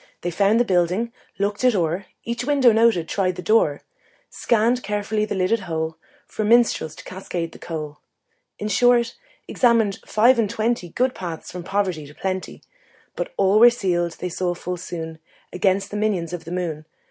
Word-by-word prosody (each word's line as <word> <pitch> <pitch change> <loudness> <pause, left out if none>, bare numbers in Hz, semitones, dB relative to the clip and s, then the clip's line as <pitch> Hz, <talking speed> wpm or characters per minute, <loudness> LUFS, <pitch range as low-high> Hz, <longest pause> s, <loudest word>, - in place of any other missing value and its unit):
They 175 - -2
found 200 +5 +3
the 245 - +3
building, 185 +5 +1 0.2
looked 205 +4 -1
it 250 -3 +4
o'er, 175 +1 -1 0.2
Each 235 +1 -3
window 275 -3 +4
noted, 220 -7 +3
tried 185 -2 -1
each 180 - -7
door, 215 -10 +2 0.5
Scanned 235 +2 +1
carefully 210 0 -1
the 205 - -4
lidded 190 +5 +1
hole 160 -4 -3 0.3
For 215 - -4
minstrels 220 -8 +3
to - - -11
cascade 180 -3 -5
the - - -14
coal 155 -3 -6 0.6
In 210 - -4
short, 240 +3 +3 0.3
examined 230 -5 +2
five 235 +3 +4
and 215 -3 +1
twenty 220 -4 -1
Good 255 +8 0
paths 170 -3 -6
from 180 -1 -7
poverty 185 -6 -1
to 145 - -15
plenty. 190 -1 -4 0.5
But - - -4
all 195 +2 +4
were 240 +2 +9
sealed, 175 -7 -1
they 180 - -5
saw 175 0 -2
full 180 +1 -5
soon, 165 -2 -6 0.3
Against 195 +2 +1
the 210 - -3
minions 190 -6 -1
of 175 - -6
the 165 - -8
moon. 165 -4 -3
195 Hz, 175 wpm, -22 LUFS, 175-225 Hz, 0.6 s, were